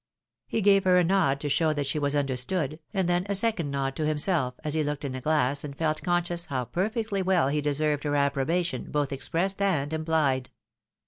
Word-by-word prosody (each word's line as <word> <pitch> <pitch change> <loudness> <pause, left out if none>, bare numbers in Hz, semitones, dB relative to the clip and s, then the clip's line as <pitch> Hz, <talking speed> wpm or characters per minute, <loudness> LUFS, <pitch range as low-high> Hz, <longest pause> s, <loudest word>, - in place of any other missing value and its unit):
He 225 - -1
gave 195 -1 +5
her 180 -1 +5
a 180 - +5
nod 170 -7 +2
to 150 - -2
show 155 +2 +2
that 145 -1 -2
she 150 +3 -1
was 145 0 0
understood, 140 +3 -1
and 190 -4 0
then 175 0 +1
a 200 - +1
second 195 -7 +2
nod 135 -1 -2
to 155 - -1
himself, 150 -4 0
as 150 -2 -1
he 160 - +1
looked 145 0 -3
in 135 - -3
the 130 0 -5
glass 145 -2 +1
and 140 -2 -7
felt 155 -1 0
conscious 175 -1 0
how 130 -3 -2
perfectly 205 - -2
well 180 -7 +2
he 150 +1 0
deserved 145 0 0
her 145 0 0
approbation 140 +1 0
both 145 -1 -1
expressed 165 +9 -1
and 160 -8 +1
imphed. 155 -5 0
155 Hz, 205 wpm, -27 LUFS, 140-175 Hz, -, gave